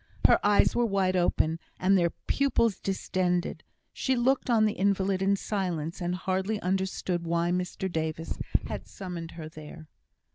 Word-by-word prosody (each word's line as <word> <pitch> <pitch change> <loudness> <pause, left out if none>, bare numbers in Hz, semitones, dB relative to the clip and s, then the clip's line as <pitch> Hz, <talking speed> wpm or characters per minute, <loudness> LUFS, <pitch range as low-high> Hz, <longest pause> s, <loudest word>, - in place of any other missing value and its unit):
Her - - +6
eyes 205 0 +4
were 240 - +3
wide 190 -2 +1
open, 165 -2 +1 0.2
and 190 +2 +4
their 175 -2 +3 0.2
pupils 235 -7 +2
distended. 185 -2 -1 0.3
She 265 - 0
looked 255 +2 +1
on 225 -2 +4
the 215 - +1
invalid 195 -1 +1
in 195 +1 +3
silence, 180 -4 -3
and 175 +1 -1
hardly 190 +3 -1
understood 185 -1 -1
why 170 +1 0
Mr 180 +1 -2
Davis 160 -2 -3 0.3
had - - -6
summoned 175 -4 -7
her 160 -2 -6
there. 155 +1 -11
185 Hz, 150 wpm, -28 LUFS, 170-200 Hz, 0.3 s, Her